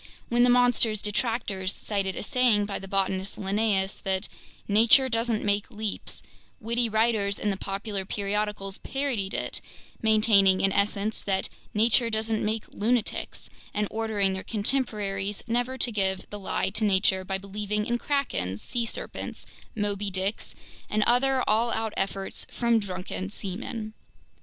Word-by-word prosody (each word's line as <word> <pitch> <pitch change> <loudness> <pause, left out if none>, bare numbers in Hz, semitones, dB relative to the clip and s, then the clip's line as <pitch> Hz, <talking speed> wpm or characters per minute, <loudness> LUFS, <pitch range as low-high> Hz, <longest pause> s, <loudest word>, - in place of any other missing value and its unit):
When 240 0 +3
the 245 - +6
monster's 245 -3 +4
detractors 210 -3 -1
cited 195 -3 -2
a - - -4
saying 235 -3 +3
by 200 - -4
the 195 - -9
botanist 190 0 0
Linnaeus 195 -1 0
that 190 +1 -1 0.4
"nature 230 +6 +6
doesn't 230 -2 0
make 205 0 +1
leaps," 215 -1 -3 0.4
witty 235 +1 0
writers 220 -2 +2
in 210 - 0
the - - -1
popular 195 +1 -4
periodicals 200 0 -2
parodied 260 -8 -2
it, - - -3 0.4
maintaining 215 -4 +5
in 195 - +3
essence 205 +2 0
that 195 -1 -1 0.3
"nature 230 +2 +5
doesn't 220 0 -1
make 215 0 -2
lunatics," 230 +1 -1 0.3
and 210 0 +1
ordering 215 -3 +1
their 190 - -3
contemporaries 205 -4 -1
never 245 +3 0
to 245 - +2
give 190 -3 0
the 205 - -6
lie 190 - -1
to 215 +2 -2
nature 190 -2 +3
by 190 +1 -2
believing 210 +2 -3
in 240 +1 0
krakens, 240 - -1
sea 235 - -2
serpents, - - -5 0.3
"Moby 205 -1 -1
Dicks," 190 +2 -2 0.3
and 210 0 +2
other 255 +3 +3
all 225 +3 +3
out 225 -1 -2
efforts 195 0 -2
from 235 -1 +2
drunken 185 -1 -5
seamen. 215 +2 -5
210 Hz, 145 wpm, -27 LUFS, 195-230 Hz, 0.4 s, the